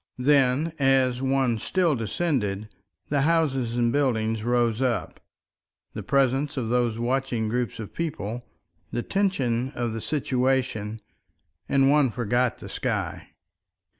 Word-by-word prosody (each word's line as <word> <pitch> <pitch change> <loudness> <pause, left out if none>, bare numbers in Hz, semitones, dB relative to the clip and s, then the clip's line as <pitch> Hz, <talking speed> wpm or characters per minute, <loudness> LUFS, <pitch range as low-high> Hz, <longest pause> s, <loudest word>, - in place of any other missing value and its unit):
Then, 140 +3 +3
as 130 -2 +3
one 135 -4 +1
still 175 - +1
descended, 110 - -1 0.4
the 140 -1 +2
houses 135 -7 +1
and 120 -1 +2
buildings 115 -6 +1
rose 120 -1 +1
up, 125 -4 -1 0.7
the - - -5
presence 140 +2 +1
of 115 -4 -2
those 120 -2 +1
watching 120 -1 -1
groups 120 +1 -2
of 110 -3 -8
people, 125 -8 -3 0.5
the 120 - -2
tension 135 -11 0
of 120 -2 -2
the 115 - -4
situation; 125 -6 -1 0.7
and 135 0 +4
one 145 -3 +4
forgot 120 +1 0
the - - -10
sky. - - -3
125 Hz, 125 wpm, -25 LUFS, 115-135 Hz, 0.7 s, and